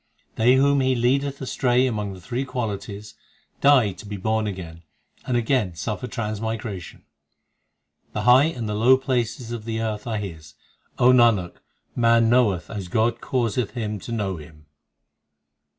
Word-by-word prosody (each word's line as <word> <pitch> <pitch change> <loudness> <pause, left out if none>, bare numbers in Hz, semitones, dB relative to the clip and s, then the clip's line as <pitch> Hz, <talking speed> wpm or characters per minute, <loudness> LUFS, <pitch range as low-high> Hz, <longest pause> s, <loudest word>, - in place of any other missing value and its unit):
They 120 +3 +4
whom 140 +1 +3
He 130 0 +2
leadeth 135 +3 0
astray 125 -1 +1
among 105 -5 -2
the - - -12
three 125 +8 -3
qualities, 105 -5 -5 0.5
Die 135 -7 +5
to 95 +3 -12
be 100 0 -5
born 110 +2 0
again, 85 -4 -7 0.5
and 125 - +1
again 115 -7 0
suffer 105 +8 -4
transmigration. 110 -4 -5 1.1
The - - -2
high 125 +3 +6
and 125 -9 -3
the 105 - -2
low 120 +5 +5
places 120 -2 -2
of 120 -2 -5
the 110 0 -3
earth 110 0 -3
are 110 -2 -1
His 80 -7 -8 0.4
O 125 +1 +5
Nanak, 115 -8 +3 0.4
man 115 -1 +4
knoweth 110 -8 +2
as 100 -5 -5
God 115 +5 0
causeth 120 -2 -1
him 105 -3 -3
to 120 - -9
know 100 -5 -2
Him. 75 0 -14
115 Hz, 150 wpm, -23 LUFS, 105-125 Hz, 1.1 s, high